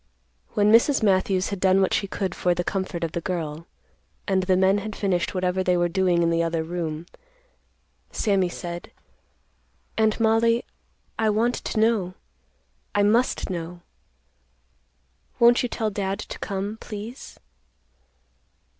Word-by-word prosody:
When 210 0 +4
Mrs. 235 +3 +4
Matthews 190 -1 +2
had 200 -2 -4
done 190 0 +4
what 190 - +2
she 200 - 0
could 190 -2 -3
for 180 -1 +1
the 175 - -1
comfort 190 -3 -3
of 165 - -2
the 170 - -3
girl, 165 -2 -4 0.6
and 190 -2 +2
the 185 0 +2
men 190 +2 +3
had 215 +1 -6
finished 190 -2 -1
whatever 185 0 0
they 180 -1 +2
were 175 0 +2
doing 180 -1 +2
in 170 - +2
the 165 0 +2
other 165 -1 -1
room, 165 -1 -4 1.1
Sammy 195 -4 +1
said, 175 0 -7 1.1
"Aunt 220 0 +2
Mollie, 230 +1 +3 0.5
I 220 -1 +3
want 225 +3 +2
to 220 - -3
know. 215 -5 +1 0.8
I 205 - +4
must 225 0 +2
know. 175 0 -5 1.6
Won't 235 +1 +6
you 245 - -2
tell 220 -2 -2
Dad 195 -1 -2
to 215 - -8
come, 200 +2 -3
please?" 215 +5 -8
190 Hz, 145 wpm, -24 LUFS, 175-215 Hz, 1.6 s, Won't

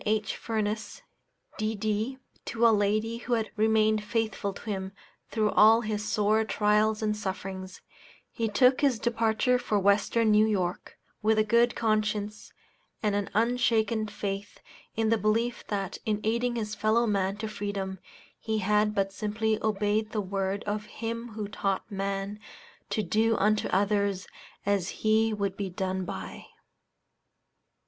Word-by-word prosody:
H. 215 0 0
Furness, 215 -1 -3 0.6
D.D., 215 +3 -1 0.3
to 235 0 +1
a 230 - +7
lady 215 +3 0
who 245 - -3
had 225 -2 0
remained 215 0 +3
faithful 215 -2 -1
to - - -11
him 190 -2 -3 0.4
through 215 -2 +1
all 220 +2 +6
his 215 -2 -2
sore 215 +1 +2
trials 215 +1 +2
and 210 0 +1
sufferings, 190 -2 -5 0.5
he 225 -2 -2
took 250 +5 +4
his 275 -5 +3
departure 230 +2 +1
for 215 -4 0
Western 205 +3 +3
New 210 +1 +5
York, 185 -4 -2 0.2
with 220 0 +3
a 215 - +5
good 235 +2 +3
conscience 215 -1 -1 0.5
and 210 -1 +2
an 205 -1 -1
unshaken 225 -1 +2
faith 200 -1 -5 0.4
in 225 0 +1
the 225 -1 +3
belief 230 +3 0
that 195 -3 -3
in 210 -1 0
aiding 235 +2 0
his 215 -2 -3
fellow 215 +3 +2
man 195 -2 0
to 220 +1 -4
freedom 200 -3 -4 0.4
he 220 -1 -2
had 210 +1 +2
but 195 -1 0
simply 215 +1 -1
obeyed 215 0 0
the 215 - 0
word 195 0 -2
of 210 +1 -3
Him 230 0 -5
who 210 -1 -4
taught 195 0 -2
man 195 +1 -3 0.5
to 215 - 0
do 220 +5 +2
unto 210 +1 +2
others 200 -1 +1 0.4
as 200 -2 +1
he 220 +1 +3
would 200 -2 -2
be 195 -1 -3
done 185 0 -2
by. 95 - -7
215 Hz, 145 wpm, -28 LUFS, 200-220 Hz, 0.6 s, a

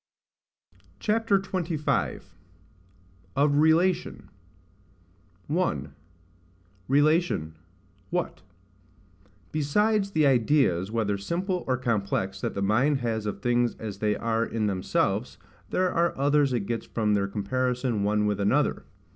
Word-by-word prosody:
CHAPTER 220 -1 +2
XXV. 175 -5 -2 1.1
OF 145 +1 +3
RELATION. 165 +4 +2 1.2
1. 80 - -1 0.9
Relation, 145 - +2 0.6
what. - - -3 1.1
BESIDES 200 +8 +1
the 155 -2 +3
ideas, 120 - +2
whether 105 -3 -1
simple 180 - -2
or 130 -1 +1
complex, 100 -5 -1
that - - -3
the 100 - -1
mind 130 +7 +2
has 110 -3 -2
of 105 - -4
things 120 0 +1
as 105 -3 -7
they 105 0 +1
are 115 0 0
in 115 -2 -2
themselves, 95 -3 -1 0.3
there 185 0 +1
are 170 0 +1
others 140 0 +3
it 120 -3 0
gets 115 +1 -3
from 105 -2 0
their 100 -1 +1
comparison 125 +3 -1
one 105 +1 +1
with 105 -1 0
another. 100 0 +1
125 Hz, 115 wpm, -26 LUFS, 105-155 Hz, 1.2 s, OF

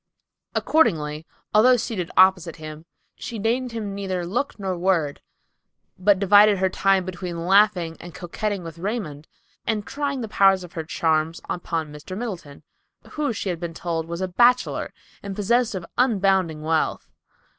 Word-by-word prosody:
Accordingly, 155 - +1 0.3
although 245 +4 +6
seated 220 -7 -3
opposite 185 -3 +4
him, 155 0 -9 0.3
she 235 - -6
deigned 235 +4 -1
him 215 -3 -4
neither 190 -3 -3
look 245 +11 -2
nor 190 -3 -3
word, 170 -5 0 0.7
but 195 +1 +3
divided 205 +1 +6
her 190 0 +1
time 190 0 +2
between 175 -2 -5
laughing 190 -4 +3
and 175 - -10
coquetting 195 +2 -3
with 165 0 -9
Raymond, 175 -7 -4 0.4
and 215 -2 -1
trying 280 -2 -3
the 225 - -4
power 195 -2 +5
of 180 -2 -6
her 160 - -4
charms 160 0 0
upon 165 -3 -3
Mr. 150 +5 -8
Middleton, 185 -11 -6 0.5
who, 300 -3 -1
she 205 -3 -3
had 175 -2 -3
been 170 -1 -5
told, 165 -2 -3
was 170 +2 -5
a 185 - 0
bachelor, 245 +7 +2 0.3
and 200 -1 -6
possessed 230 +2 +1
of 180 -3 -5
unbounded 195 -9 +2
wealth. 155 +1 -1
190 Hz, 155 wpm, -23 LUFS, 165-210 Hz, 0.7 s, although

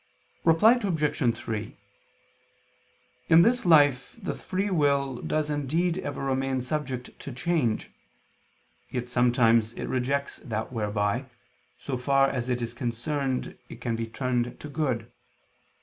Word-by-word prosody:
Reply 215 +10 +5
Obj. 150 - +1
3: 110 -1 -5 1.5
In 165 +1 +8
this 240 -1 +2
life 145 -5 +4
the 195 - -3
free 195 +2 -2
will 140 -6 +1
does 155 -1 -1
indeed 165 +5 0
ever 145 -5 -4
remain 135 -1 0
subject 130 -2 -3
to 140 - -7
change: 140 -4 -1 1.0
yet 125 -1 -4
sometimes 115 -2 +3
it - - -5
rejects 140 +3 -1
that 110 -2 -5
whereby, 105 +2 -1 0.5
so 135 -2 -4
far 135 +2 +3
as 125 -1 -3
it 125 -1 0
is 115 - -4
concerned, 125 +3 -2
it - - -10
can 115 -2 -2
be 115 0 -3
turned 125 +1 -2
to 150 - -8
good. 140 -5 -2
135 Hz, 130 wpm, -27 LUFS, 120-150 Hz, 1.5 s, In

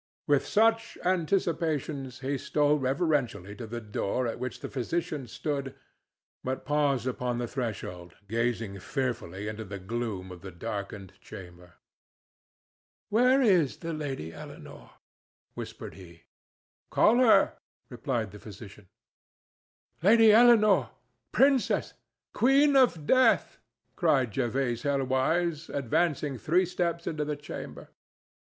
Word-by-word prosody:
With 145 -2 +2
such 225 +1 +2
anticipations 160 -7 -1
he 140 +1 -1
stole 150 0 +2
reverentially 135 - -1
to 115 - -7
the 120 +2 -5
door 110 +2 -2
at 115 - -3
which 130 0 -5
the - - -4
physician 150 +1 -3
stood, 140 +2 -4 0.7
but 130 +1 -4
paused 145 -4 +1
upon 125 -1 -2
the 120 - -2
threshold, 95 -9 -5
gazing 115 -2 -2
fearfully 120 - -3
into 110 +1 -5
the 100 -1 -7
gloom 100 -2 -4
of 90 -1 -10
the 95 - -8
darkened 100 +2 -6
chamber. 90 -1 -12 1.4
"Where 250 +5 +4
is 180 - +3
the 165 -1 -5
Lady 135 - -5
Eleanore?" - - -11 0.6
whispered - - -8
he. 85 -3 -14 0.7
"Call 230 - +4
her," 245 -4 +4 0.3
replied 115 -8 -3
the 105 - -11
physician. 105 -1 -12 1.1
"Lady 220 +4 +6
Eleanore! 215 - +6 0.4
princess! 270 0 +2 0.4
queen 275 +3 +4
of 240 - +3
Death!" 260 - +3 0.4
cried 135 - +2
Jervase 120 +2 -1
Helwyse, 145 +4 0
advancing 145 0 -1
three 175 - +2
steps 170 -1 -2
into 155 -1 -2
the 150 0 -3
chamber. 145 - -8
135 Hz, 115 wpm, -28 LUFS, 110-170 Hz, 1.4 s, Lady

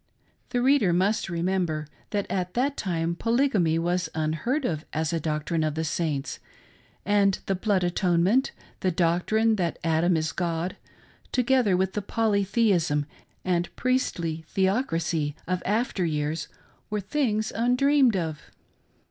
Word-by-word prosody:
The 245 -1 0
reader 260 -9 +4
must 190 +4 +1
remember 170 -3 -1 0.2
that 205 -2 -1
at 180 -1 -3
that 270 +3 +1
time 170 -3 -1
polygamy 230 - +2
was 175 +1 0
unheard 160 - -1
of 155 -6 -2
as 160 0 -1
a 165 - +1
doctrine 155 +1 -1
of 155 -1 -1
the 160 - -1
Saints, 150 -3 -2 0.7
and 200 -1 +3
the 195 - 0
blood 190 -1 +1
atonement, 180 +6 +2 0.3
the 185 - +1
doctrine 180 +6 +2
that 175 -3 -1
Adam 165 +1 +2
is 155 0 -1
God, 170 0 -2 0.6
together 250 -6 +3
with 190 0 0
the 210 - -1
polytheism 200 -7 +1 0.4
and 175 -1 0
priestly 170 -11 -1
theocracy 170 - 0
of 180 0 -1
after 215 -1 0
years 150 -1 -1 0.4
were 210 0 -1
things 215 0 -1
undreamed 250 +2 +3
of. 160 -4 -3
180 Hz, 130 wpm, -26 LUFS, 165-215 Hz, 0.7 s, reader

